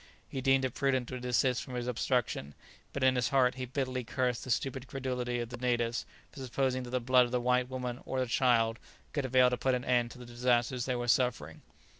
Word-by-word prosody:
He 135 - -5
deemed 135 0 +3
it 130 - -3
prudent 130 -3 0
to 130 - -5
desist 125 +1 +1
from 130 - -7
his 120 -1 -2
obstruction, 120 - -1 0.4
but 140 - -3
in 130 0 +5
his 125 -1 +1
heart 130 -3 +3
he 130 0 -5
bitterly 130 -1 -2
cursed 125 0 -1
the - - -8
stupid 130 +1 -1
credulity 125 -2 -3
of 120 -1 -4
the 125 - -7
natives 120 -2 -1 0.2
for - - -12
supposing 130 0 0
that 125 - -7
the 125 +1 0
blood 125 +1 +4
of 120 - -7
the 125 - +1
white 125 +1 +1
woman 125 -1 -4
or 130 - -3
the 130 - +1
child 120 -2 +2 0.3
could 145 -3 -1
avail 130 -1 +4
to 125 - 0
put 130 0 +1
an 125 - -4
end 120 -2 +2
to - - -12
the 125 - -10
disasters 120 +1 0
they 130 - -1
were 120 0 -3
suffering. 115 - +1
125 Hz, 230 wpm, -31 LUFS, 120-130 Hz, 0.4 s, in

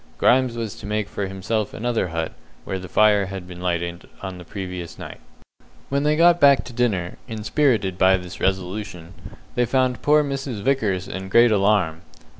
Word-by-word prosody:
Grimes 125 -2 +3
was 115 -3 -3
to - - -9
make 105 0 -1
for 100 -1 -4
himself 100 +3 -3
another 120 -4 -1
hut 80 -1 -3 0.3
where 95 - -3
the 90 -1 -9
fire 105 -1 +4
had 95 -2 -7
been 90 -1 -10
lighted 85 -1 -3
on 95 -2 -6
the - - -9
previous 90 -2 -7
night. - - -9 0.7
When 140 +1 +1
they 150 +1 +2
got 170 +2 +5
back 140 -3 +6
to 125 - -10
dinner, 105 -8 -1
inspirited 110 - 0
by 95 0 +5
this 90 -1 -9
resolution, 95 -1 -3 0.4
they 125 - +2
found 130 -1 +1
poor 150 +1 +4
Mrs. 135 -6 -4
Vickers 105 -9 0
in 95 0 -6
great 115 +3 +5
alarm. 100 -6 +2
105 Hz, 175 wpm, -22 LUFS, 95-120 Hz, 0.7 s, back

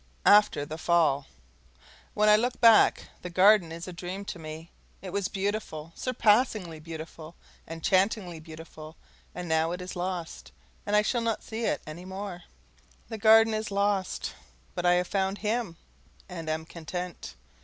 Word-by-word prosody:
After 205 -8 +5
the 155 +2 -7
Fall 160 -5 +2 0.9
When 210 0 +3
I 210 - +8
look 245 +3 0
back, 230 -2 +6 0.2
the 180 - -6
Garden 185 -1 +5
is 165 +2 -7
a 180 - -7
dream 185 +3 -6
to 175 - -6
me. 160 +1 -9 0.3
It 185 -2 -8
was 200 -2 0
beautiful, 195 -6 -4
surpassingly 215 -8 +1
beautiful, 160 0 -9 0.3
enchantingly 180 +2 0
beautiful; 155 0 -11 0.4
and 180 0 -5
now 160 +1 +1
it 180 - -5
is 180 0 -7
lost, 180 -2 -5 0.4
and 205 - +1
I 210 - +5
shall 240 +2 0
not 230 -1 -1
see 225 +1 -4
it - - -1
any 160 +4 -9
more. 190 -1 -6 0.7
The 225 -2 -6
Garden 225 +1 +6
is 215 0 -2
lost, 200 -1 -1 0.4
but 175 - -1
I 175 - +6
have 180 0 +1
found 195 +1 -1
HIM, 215 -5 -2 0.5
and 165 -4 -6
am 160 0 -2
content. 170 - -7
180 Hz, 155 wpm, -28 LUFS, 165-210 Hz, 0.9 s, I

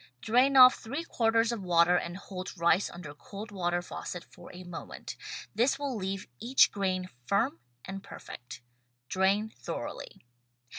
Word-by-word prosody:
Drain 255 - +3
off 255 0 +11
three 280 +8 -4
quarters 230 -6 +2
of 235 -3 -3
water 175 -1 +4
and 175 0 -2
hold 185 -1 -7
rice 170 +3 +3
under 170 -4 -9
cold 200 +8 -9
water 175 -2 -1
faucet 180 0 -6
for - - -14
a 185 0 -10
moment; 175 -2 -7 0.4
this 245 +6 +2
will 280 -3 -3
leave 195 -1 -3
each 255 +3 +5
grain 185 -2 -1 0.2
firm 200 - +1 0.3
and 195 0 -6
perfect. 120 -9 -10 0.5
Drain 195 +3 +2
thoroughly. 120 - -7
195 Hz, 145 wpm, -30 LUFS, 175-225 Hz, 0.5 s, off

